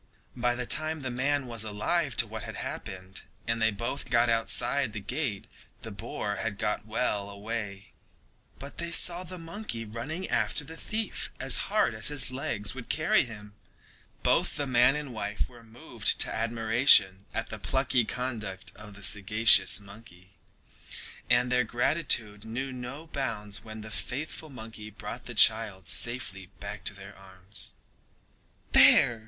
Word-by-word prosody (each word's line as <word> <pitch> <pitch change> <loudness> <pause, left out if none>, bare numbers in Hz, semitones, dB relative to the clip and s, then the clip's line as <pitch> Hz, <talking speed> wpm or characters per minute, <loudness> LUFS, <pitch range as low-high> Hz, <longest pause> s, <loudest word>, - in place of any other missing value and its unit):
By 120 -1 +1
the 125 0 -2
time 155 +3 +3
that - - -10
the - - -6
man 140 +2 +1
was 115 -3 -3
alive 115 +7 -1
to - - +4
what - - -7
had - - -7
happened, 95 0 -6 0.2
and 115 0 -1
they 110 - +4
both 115 +6 -4
got 120 -1 +3
outside 115 +2 +1
the 105 - -4
gate, 120 0 -3 0.4
the 110 - -6
boar 105 -1 -4
had 115 -3 -3
got 105 +1 -2
well 105 -3 -1
away, 100 -1 -6 0.7
but 140 +1 -9
they 170 0 -1
saw 175 +1 +3
the 185 +1 -8
monkey 165 - -6
running 130 - -5
after 115 +4 0
the 160 +3 -9
thief 215 +4 -3
as - - +2
hard - - +2
as 110 -1 -3
his 145 -3 -1
legs 110 -5 -1
would 125 -2 -9
carry 155 -2 +3
him. 105 -3 -10 0.7
Both - - +2
the 145 - 0
man 125 +1 +4
and 150 -4 -5
wife 105 -1 -3
were 120 -2 -16
moved 115 +1 -2
to - - +3
admiration 110 -3 +4
at - - -4
the - - -6
plucky 130 -2 +1
conduct 110 -6 -4
of 105 -1 -12
the 100 - -11
sagacious 105 +3 +5
monkey, 100 -3 -15 1.0
and 120 0 +3
their 125 0 +4
gratitude 120 -4 +1
knew 130 +4 -4
no 125 +5 -7
bounds 115 -9 -3
when 110 -1 -9
the 110 0 -9
faithful 155 +7 -5
monkey 110 -4 -9
brought 110 +3 -8
the 120 - -7
child 105 -4 +5
safely 110 -6 +1
back - - -7
to - - +2
their 100 +1 -11
arms. 95 -1 -7 1.0
"There!" 120 -2 +7
115 Hz, 160 wpm, -29 LUFS, 105-130 Hz, 1.0 s, There